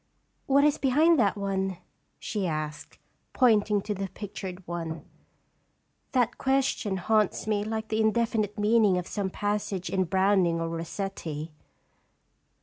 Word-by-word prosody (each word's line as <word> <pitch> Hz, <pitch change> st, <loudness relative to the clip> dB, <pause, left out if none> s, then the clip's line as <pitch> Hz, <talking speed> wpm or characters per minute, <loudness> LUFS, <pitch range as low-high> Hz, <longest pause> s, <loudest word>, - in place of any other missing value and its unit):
What 280 Hz, +1 st, +4 dB
is 295 Hz, -1 st, +3 dB
behind 300 Hz, +4 st, +4 dB
that 205 Hz, -3 st, +2 dB
one?" 195 Hz, -2 st, -2 dB, 0.4 s
she 205 Hz, -4 st, -3 dB
asked, 155 Hz, -1 st, -5 dB, 0.4 s
pointing 210 Hz, -5 st, +3 dB
to 210 Hz, -, -2 dB
the 195 Hz, -1 st, -4 dB
pictured 190 Hz, -3 st, -7 dB
one. 165 Hz, -1 st, -5 dB, 0.5 s
" -, -, -45 dB
That 245 Hz, -3 st, +1 dB
question 265 Hz, -7 st, +1 dB
haunts 215 Hz, +2 st, +1 dB
me 210 Hz, -1 st, 0 dB
like 220 Hz, 0 st, -4 dB
the 220 Hz, 0 st, +1 dB
indefinite 220 Hz, -1 st, +1 dB
meaning 210 Hz, -2 st, +4 dB
of 180 Hz, -, -2 dB
some 200 Hz, 0 st, -3 dB
passage 205 Hz, -3 st, -2 dB
in 190 Hz, -1 st, +1 dB
Browning 190 Hz, -1 st, +2 dB
or 165 Hz, 0 st, -2 dB
Rossetti." 165 Hz, -2 st, -5 dB
205 Hz, 135 wpm, -27 LUFS, 185-220 Hz, 0.5 s, What